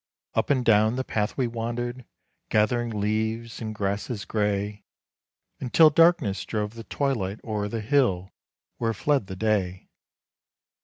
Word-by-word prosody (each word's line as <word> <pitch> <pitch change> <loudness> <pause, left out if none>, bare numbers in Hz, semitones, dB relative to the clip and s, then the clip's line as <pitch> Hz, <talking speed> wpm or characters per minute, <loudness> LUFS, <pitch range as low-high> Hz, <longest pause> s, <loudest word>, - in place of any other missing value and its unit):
Up - - 0
and 130 -4 +2
down 110 +1 +4
the 130 - -1
path 105 -3 -2
we 130 - +2
wandered, 120 +1 -4 0.4
gathering 115 +3 +2
leaves 110 +2 -2
and 110 -1 -4
grasses 100 +2 -2
gray, 105 -1 -1 0.8
Until 155 +5 +5
darkness 165 - +4
drove 105 -1 -3
the 115 -1 -9
twilight 110 -7 -1
o'er 105 -2 -2
the 110 +1 -3
hill 105 -7 +1 0.5
where 115 -1 -1
fled 140 -1 +1
the 95 - -6
day. 95 -3 -1
110 Hz, 135 wpm, -26 LUFS, 105-120 Hz, 0.8 s, Until